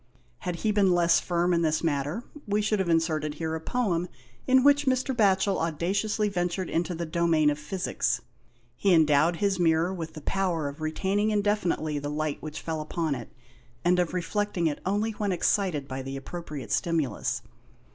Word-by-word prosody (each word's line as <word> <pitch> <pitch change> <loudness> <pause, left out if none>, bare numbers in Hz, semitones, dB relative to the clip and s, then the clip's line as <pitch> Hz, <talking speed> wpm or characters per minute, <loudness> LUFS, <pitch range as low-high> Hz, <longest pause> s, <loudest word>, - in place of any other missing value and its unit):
Had 180 -1 -3
he 215 - +4
been 195 -3 +3
less 170 -1 +4
firm 175 0 +1
in 170 - +2
this 160 0 +1
matter 150 - -1 0.2
we 205 +1 +1
should 215 0 +1
have 190 -2 0
inserted 160 -2 +1
here 160 -1 -3
a 160 - -3
poem 180 -5 0 0.4
in 260 0 +5
which 285 0 +4
Mr. 260 0 +1
Batchel 195 -3 +3
audaciously 190 +7 0
ventured 180 -1 -2
into 175 +1 -1
the 170 +1 -3
domain 160 -2 +2
of 145 - -4
Physics. 180 +5 -1 0.6
He 195 +4 +3
endowed 155 +1 +4
his 195 +1 0
mirror 165 +1 +2
with 165 -3 -6
the' 155 - -7
power 175 -3 -1
of 140 +2 -8
retaining 195 +7 0
indefinitely 205 -8 0
the 145 0 -4
light 150 0 -2
which 155 0 -6
fell 160 -1 -3
upon 155 0 -2
it, 120 -4 -7 0.5
and 180 +1 +4
of 180 0 0
reflecting 185 0 -1
it 150 -2 -1
only 205 +3 +1
when 210 -2 -2
excited 180 -5 0
by 130 0 -4
the 135 +1 -5
appropriate 140 - -7
stimulus. 165 -6 0
170 Hz, 175 wpm, -27 LUFS, 155-195 Hz, 0.6 s, in